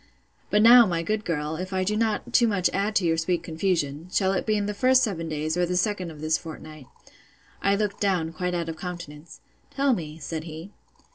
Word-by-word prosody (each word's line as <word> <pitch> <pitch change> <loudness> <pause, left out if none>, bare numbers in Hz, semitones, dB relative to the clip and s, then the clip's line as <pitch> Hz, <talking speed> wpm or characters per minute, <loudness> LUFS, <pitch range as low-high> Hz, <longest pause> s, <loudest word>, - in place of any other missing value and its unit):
But 210 +1 +3
now, 240 0 +9
my 170 -2 -1
good 215 +4 -1
girl, 155 -2 -2
if 185 +2 -5
I 185 0 +1
do 210 +3 -1
not 220 -1 -1
too 235 - +5
much 195 -4 +1
add 205 +2 -1
to 190 - +2
your 165 -1 +2
sweet 165 +1 -1
confusion, 160 -2 -2
shall 190 0 +1
it 195 - -2
be 215 -1 +2
in 205 - -1
the 210 - -2
first 255 +4 +4
seven 165 -7 -2
days, 155 +1 -2
or 180 - +1
the 180 +1 0
second 185 -2 -1
of 155 -2 -11
this 155 0 +1
fortnight? 155 -4 -10 0.7
I 200 0 +3
looked 205 -1 -2
down, 180 -5 0
quite 180 +2 -2
out 170 -1 -2
of 165 -1 -5
countenance. 170 -3 -8 0.3
Tell 275 -1 +1
me, 155 -7 -5
said 160 +1 -5
he. 160 +4 -9
180 Hz, 220 wpm, -25 LUFS, 160-205 Hz, 0.7 s, now